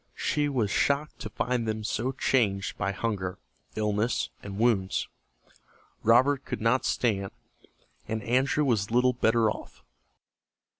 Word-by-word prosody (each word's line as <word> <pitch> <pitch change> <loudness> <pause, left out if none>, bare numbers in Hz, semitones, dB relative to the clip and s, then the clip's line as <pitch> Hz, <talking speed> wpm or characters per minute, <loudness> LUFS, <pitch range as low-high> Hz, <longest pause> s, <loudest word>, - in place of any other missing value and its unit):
She 145 -1 0
was 115 -8 0
shocked 145 +7 0
to 110 - -5
find 120 0 -1
them 110 0 -2
so 115 +4 -1
changed 105 -8 0
by 100 +2 -1
hunger, 95 -3 -3 0.4
illness, 105 +2 0
and 100 -1 -7
wounds. 105 -5 +1 0.9
Robert 130 +5 +4
could - - -4
not 115 +4 +2
stand, 100 -5 0 0.8
and 110 0 -3
Andrew 130 +6 +2
was 110 -6 +1
little 125 +2 +3
better 115 -2 +2
off. - - -9
115 Hz, 130 wpm, -28 LUFS, 105-125 Hz, 0.9 s, Robert